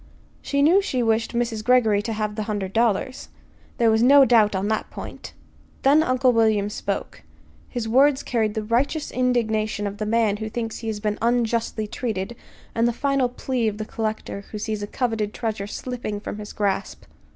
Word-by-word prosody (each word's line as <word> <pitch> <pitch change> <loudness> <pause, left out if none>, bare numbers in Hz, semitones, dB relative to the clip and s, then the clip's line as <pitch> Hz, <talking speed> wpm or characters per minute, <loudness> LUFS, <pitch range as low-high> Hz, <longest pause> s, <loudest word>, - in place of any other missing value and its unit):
She 280 0 0
knew 350 +7 +5
she 255 -11 -1
wished 225 +1 0
Mrs. 230 -2 -1
Greggory 225 -4 +4
to 225 +1 -3
have 210 -1 -2
the 215 - -4
hundred 195 -3 -3
dollars. 235 +3 0 0.5
There 230 -2 +4
was 220 0 +3
no 275 +3 +7
doubt 220 -5 +4
on 190 +2 -1
that 220 - -1
point. - - -9 0.5
Then 285 +3 +6
Uncle 255 -4 +3
William 215 -3 +2
spoke. - - -4 0.5
His 240 -3 -3
words 270 +4 +4
carried 220 -4 0
the 220 - -2
righteous 265 +8 0
indignation 220 -4 0
of 200 0 -5
the 215 - -2
man 220 -2 +2
who 220 0 -4
thinks 225 0 -4
he 230 - -6
has 215 -2 -2
been 210 0 -2
unjustly 230 -2 0
treated, 215 -1 -4 0.4
and 230 +1 +2
the 240 - 0
final 275 0 +1
plea 250 -1 -2
of 210 -1 -2
the 215 - -4
collector 215 -2 -4
who 215 - -5
sees 215 0 -3
a 205 - -4
coveted 220 -3 -2
treasure 215 -4 -3
slipping 230 -2 -5
from 205 - -6
his 210 0 -7
grasp. 200 -2 -2
225 Hz, 185 wpm, -23 LUFS, 210-245 Hz, 0.5 s, no